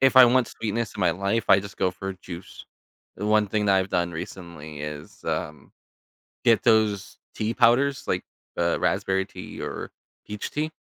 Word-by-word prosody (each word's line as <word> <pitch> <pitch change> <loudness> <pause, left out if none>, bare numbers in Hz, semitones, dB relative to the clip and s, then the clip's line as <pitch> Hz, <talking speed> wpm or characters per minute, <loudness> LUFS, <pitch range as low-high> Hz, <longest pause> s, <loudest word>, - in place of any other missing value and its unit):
if 135 0 +4
I 130 - +12
want 125 0 +3
sweetness 115 0 -3
in - - -5
my 90 -2 +4
life, 100 +5 0
I 100 - +8
just 100 0 -9
go 95 -1 +1
for 95 +1 -5
a - - -6
juice. 90 0 -9 0.5
The 105 - -3
one 105 -1 +4
thing 105 +1 0
that 95 -1 +5
I've 95 +1 0
done 85 0 +1
recently 80 -3 -8
is, 75 0 -7
um, 75 -2 -4 0.7
get 115 -1 +5
those 110 -3 +2 0.2
tea 110 +2 -1
powders, 130 +5 +3
like, - - 0 0.3
uh, 85 0 +1
raspberry 95 0 +1
tea - - -9
or - - -5 0.4
peach 105 0 -5
tea, 155 +2 -2
100 Hz, 180 wpm, -25 LUFS, 90-115 Hz, 0.7 s, I